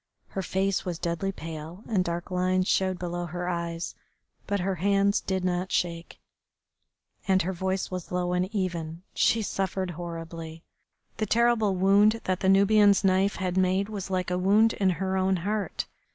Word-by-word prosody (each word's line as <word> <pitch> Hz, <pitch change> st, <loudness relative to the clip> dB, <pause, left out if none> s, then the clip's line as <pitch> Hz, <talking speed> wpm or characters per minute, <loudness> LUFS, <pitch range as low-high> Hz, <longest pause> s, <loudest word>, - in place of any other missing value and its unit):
Her 195 Hz, -, -3 dB
face 190 Hz, +1 st, 0 dB
was 175 Hz, -3 st, -3 dB
deadly 170 Hz, +3 st, -2 dB
pale, 165 Hz, +2 st, -8 dB
and 200 Hz, -5 st, +1 dB
dark 170 Hz, +1 st, -4 dB
lines 185 Hz, +1 st, +1 dB
showed 185 Hz, -1 st, +1 dB
below 175 Hz, 0 st, -4 dB
her 175 Hz, +2 st, -4 dB
eyes, 170 Hz, -1 st, -3 dB, 0.5 s
but 200 Hz, -2 st, 0 dB
her 190 Hz, +2 st, 0 dB
hands 200 Hz, +1 st, +3 dB
did 190 Hz, -1 st, -2 dB
not 180 Hz, +1 st, -1 dB
shake, 170 Hz, -1 st, -2 dB, 1.1 s
and 190 Hz, -2 st, +3 dB
her 190 Hz, +3 st, -2 dB
voice 190 Hz, +1 st, -2 dB
was 185 Hz, -2 st, -5 dB
low 180 Hz, 0 st, 0 dB
and 180 Hz, +1 st, +1 dB
even. 175 Hz, -5 st, -3 dB
She 225 Hz, -1 st, +2 dB
suffered 190 Hz, -2 st, -2 dB
horribly. 165 Hz, -1 st, -7 dB, 0.5 s
The 215 Hz, -, -1 dB
terrible 225 Hz, -3 st, +3 dB
wound 200 Hz, +4 st, +4 dB
that 185 Hz, -1 st, -1 dB
the 190 Hz, -, +1 dB
Nubian's 200 Hz, +1 st, +5 dB
knife 195 Hz, +1 st, +3 dB
had 185 Hz, -1 st, -2 dB
made 190 Hz, +2 st, +2 dB
was 200 Hz, -3 st, -5 dB
like 185 Hz, -1 st, -1 dB
a 180 Hz, -, 0 dB
wound 210 Hz, +4 st, +4 dB
in 195 Hz, -2 st, +1 dB
her 190 Hz, +1 st, -1 dB
own 190 Hz, 0 st, +2 dB
heart. 210 Hz, -1 st, -2 dB
185 Hz, 165 wpm, -27 LUFS, 175-195 Hz, 1.1 s, Nubian's